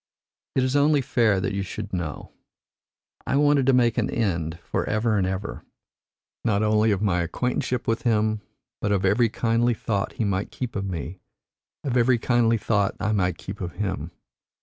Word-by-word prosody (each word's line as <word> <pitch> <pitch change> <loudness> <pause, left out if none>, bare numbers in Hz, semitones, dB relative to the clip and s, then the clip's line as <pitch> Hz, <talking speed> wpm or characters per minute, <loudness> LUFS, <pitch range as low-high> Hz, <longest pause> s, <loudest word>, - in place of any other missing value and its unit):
It 130 - +3
is 130 +1 0
only 145 0 +4
fair 115 -6 +2
that 95 - -2
you 100 - -1
should 100 +1 -6
know. 85 -5 -4 1.0
I - - +1
wanted 145 -2 +3
to 135 - +5
make 120 -2 +3
an - - 0
end 85 -7 -1
for - - -1
ever 110 +1 +1
and 95 -2 +1
ever, 95 +2 -4 0.8
not 110 -3 +1
only 110 +1 +3
of 100 -1 +1
my 90 -4 +2
acquaintanceship 125 +7 -2
with 115 0 +1
him, 110 -2 +1 0.4
but 105 - 0
of 95 -1 +1
every 110 +5 +3
kindly 115 +1 +1
thought 100 -2 -2
he 115 - -1
might 100 -1 -1
keep 125 -2 -5
of 100 -2 -2
me, 90 -1 -5 0.6
of 130 -4 -1
every 120 +1 +4
kindly 115 -1 +2
thought 105 -2 0
I 105 +1 0
might 90 -5 +1
keep 95 +4 -8
of 90 -1 -4
him. 95 -5 -3
105 Hz, 180 wpm, -25 LUFS, 95-120 Hz, 1.0 s, to